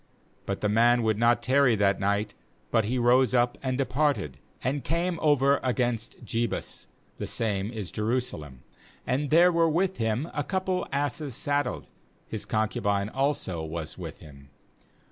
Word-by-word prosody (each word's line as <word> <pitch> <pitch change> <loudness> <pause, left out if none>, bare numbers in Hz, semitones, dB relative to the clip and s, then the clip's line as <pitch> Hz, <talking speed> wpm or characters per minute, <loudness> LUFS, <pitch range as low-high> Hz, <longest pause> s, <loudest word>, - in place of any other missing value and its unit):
10But 100 - -3
the - - +1
man 120 +3 +4
would 110 -1 +1
not 120 +1 +3
tarry 130 -2 +4
that 100 -1 +2
night, 100 +1 0 0.4
but 115 -3 +3
he 125 +4 -1
rose 125 +1 +4
up 120 0 +2
and 130 -1 -1
departed, 135 - 0 0.2
and 135 +3 -1
came 170 0 -1
over 140 -2 +4
against 120 -2 -2
Jebus 115 -1 -3
— - - -37
the - - -3
same 105 -3 -1
is 110 -6 -6
Jerusalem; 105 - -3 0.4
and 140 +3 -1
there 175 +3 +6
were 165 -1 +3
with 185 +4 0
him 115 +6 -1
a 145 - -1
couple 185 +1 -1
of - - -17
asses 140 -1 -2
saddled; 145 +2 -2 0.4
his - - -5
concubine 105 -2 0
also 135 - -1
was 80 -1 -5
with - - -8
him. 70 -2 -14
120 Hz, 160 wpm, -27 LUFS, 105-145 Hz, 0.4 s, there